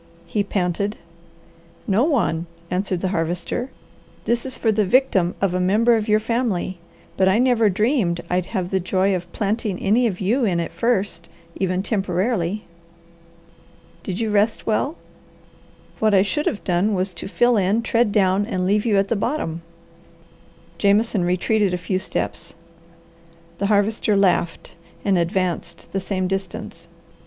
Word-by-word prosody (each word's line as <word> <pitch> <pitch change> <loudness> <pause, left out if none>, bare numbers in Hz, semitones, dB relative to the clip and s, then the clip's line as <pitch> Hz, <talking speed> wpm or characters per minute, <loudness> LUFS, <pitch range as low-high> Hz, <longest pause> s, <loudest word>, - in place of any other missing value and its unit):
he 200 +5 -1
panted. 200 +1 -1 0.9
"No 205 +4 +2
one," 200 - 0 0.2
answered 185 -1 -1
the 190 - 0
Harvester. 175 +8 -2 0.6
"This 235 +2 0
is 260 - -1
for 225 - +2
the 215 0 +2
victim 190 -5 +2
of 195 -2 +1
a 180 - 0
member 215 +6 +3
of 220 -1 -1
your 215 0 +4
family, 215 -6 -1 0.4
but 190 0 +4
I 190 - +3
never 240 -3 +3
dreamed 210 -3 +1
I'd 180 0 -1
have 185 -1 -3
the 190 - +2
joy 190 +2 +1
of 175 -1 -6
planting 210 -2 -1
any 225 +6 +2
of 185 -5 -3
you 230 +8 +1
in 180 -6 +1
it 170 - -3
first, 200 -7 -1 0.3
even 185 0 -1
temporarily. 195 -1 -1 1.4
Did 185 -1 -4
you 220 -2 -1
rest 210 +2 +1
well? 275 +8 0 1.0
What 215 -2 +3
I 190 - +5
should 295 +9 -1
have 210 - -2
done 190 +4 +1
was 185 0 -1
to 175 - -7
fill 240 +4 +3
in, 205 +3 +2
tread 230 -2 +2
down, 200 0 +2
and 185 -5 -1
leave 205 +4 +1
you 210 -3 +3
at 195 0 +2
the 230 - 0
bottom." 200 - -2 1.2
Jameson 205 -1 +2
retreated 185 +2 +1
a - - -2
few 185 +1 -2
steps. 170 -2 -3 1.0
The 200 - +1
Harvester 210 0 +2
laughed 180 -3 +1 0.3
and 200 -2 +3
advanced 170 0 -2
the 195 - -1
same 190 -1 -2
distance. 195 +1 -5
200 Hz, 155 wpm, -22 LUFS, 185-220 Hz, 1.4 s, I